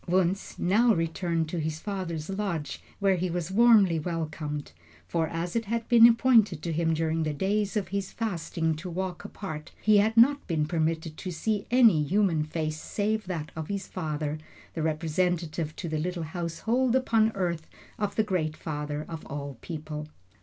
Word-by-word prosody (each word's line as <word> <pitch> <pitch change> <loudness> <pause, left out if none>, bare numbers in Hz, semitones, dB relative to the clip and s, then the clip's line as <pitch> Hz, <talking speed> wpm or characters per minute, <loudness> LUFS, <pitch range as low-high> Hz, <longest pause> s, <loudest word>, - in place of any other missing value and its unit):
Wunzh 185 +2 0
now 220 +5 +4
returned 165 0 -1
to 175 - -2
his 155 0 -2
father's 170 -5 -4
lodge, 195 -6 -3 0.2
where 195 -2 +2
he 180 +1 -1
was 175 +1 -3
warmly 205 -6 +5
welcomed. 155 -3 -4 0.4
For 165 -2 0
as 170 +4 -4
it 230 -1 0
had 230 +2 -2
been 235 -1 +9
appointed 230 - +4
to 170 - -2
him 165 0 +1
during 160 0 0
the 155 -2 -1
days 205 +5 0
of 205 - -2
his 200 -1 -3
fasting 165 -6 -2
to 175 +4 -6
walk 185 +1 -4
apart, 155 -7 -7
he 215 -1 +4
had 220 +3 +2
not 280 +5 +5
been 160 -4 +1
permitted 160 -1 -1
to 185 - -5
see 200 +5 -2
any 230 -10 +6
human 170 0 +2
face 155 0 -3
save 215 -1 -1
that 160 -5 -4
of 160 -1 -5
his 200 -1 -3
father, 155 -3 -3 0.3
the 165 - -3
representative 160 0 -1
to 175 - -5
the 155 -1 -2
little 175 +1 -2
household 185 +10 0
upon 225 -4 +3
earth 170 -4 -2 0.3
of 205 -1 -1
the 220 - +3
great 170 -7 -1
Father 150 -1 -4
of 165 -2 -7
all 140 -3 -6
people. 155 -2 -6
170 Hz, 175 wpm, -28 LUFS, 155-200 Hz, 0.4 s, been